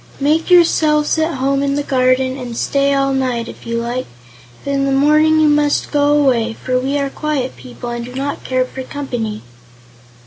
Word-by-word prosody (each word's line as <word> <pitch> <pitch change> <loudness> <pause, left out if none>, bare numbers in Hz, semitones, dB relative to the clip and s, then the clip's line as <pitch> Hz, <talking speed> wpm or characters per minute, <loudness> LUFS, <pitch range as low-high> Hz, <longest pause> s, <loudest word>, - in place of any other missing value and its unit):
Make 305 +5 +1
yourselves 315 -3 +3
at 315 0 0
home 275 +1 0
in 280 0 0
the 290 - -1
garden 255 -1 +1
and 245 -3 -7
stay 280 0 +1
all 275 -1 +1
night, 255 -3 -1
if - - -11
you 230 0 -2
like; 240 +2 -3 0.6
but 280 - -2
in 275 0 0
the 275 - 0
morning 305 +3 +4
you 310 - +4
must 295 -1 +1
go 290 0 +3
away, 235 -5 +1
for 255 +2 -2
we 270 +3 -1
are 280 -1 -2
quiet 290 -4 -3
people 125 - -8
and 240 0 -4
do 250 +1 -9
not 280 +2 -4
care 255 0 0
for 265 - -8
company." 245 -6 -5
275 Hz, 195 wpm, -17 LUFS, 255-290 Hz, 0.6 s, morning